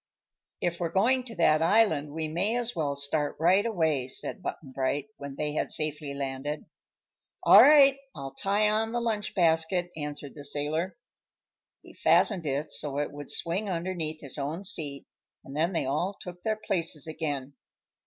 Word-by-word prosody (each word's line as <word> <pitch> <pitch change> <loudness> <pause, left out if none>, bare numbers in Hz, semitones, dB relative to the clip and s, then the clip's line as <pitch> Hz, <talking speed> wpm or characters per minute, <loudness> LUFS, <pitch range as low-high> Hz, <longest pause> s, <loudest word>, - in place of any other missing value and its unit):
"If 170 -1 -1
we're 170 -2 -1
going 245 +9 +2
to 235 - -7
that 155 -3 +4
island 165 -5 +3
we 160 +1 -2
may 185 +9 0
as 240 -1 -1
well 145 -3 -1
start 145 +1 -1
right 180 +5 +4
away," 160 - 0
said 160 - -3
Button 145 -6 -6
Bright, 135 +7 -1
when 140 -1 -7
they 150 0 -2
had - - -1
safely 150 -2 -2
landed. 140 +2 -4 0.8
"All - - +9
right; 275 -2 +7 0.2
I'll 135 -1 -7
tie 205 +2 +1
on 220 +2 +1
the 240 - +1
lunch 220 -3 -2
basket," 175 0 +2
answered 145 -2 -5
the 145 - -10
sailor. 150 +7 -2 0.9
He - - -14
fastened 185 -8 +3
it 145 +2 -2
so 140 -2 -1
it 145 - -1
would 145 0 -9
swing 190 +5 -1
underneath 165 -3 -3
his 140 0 -5
own 155 +7 -3
seat 150 -8 -2 0.4
and 135 - -10
then 165 +4 +1
they 170 - -1
all 175 +9 -1
took 180 -1 -9
their 215 +1 -1
places 165 -7 -1
again. 145 -4 -3
160 Hz, 170 wpm, -28 LUFS, 145-195 Hz, 0.9 s, All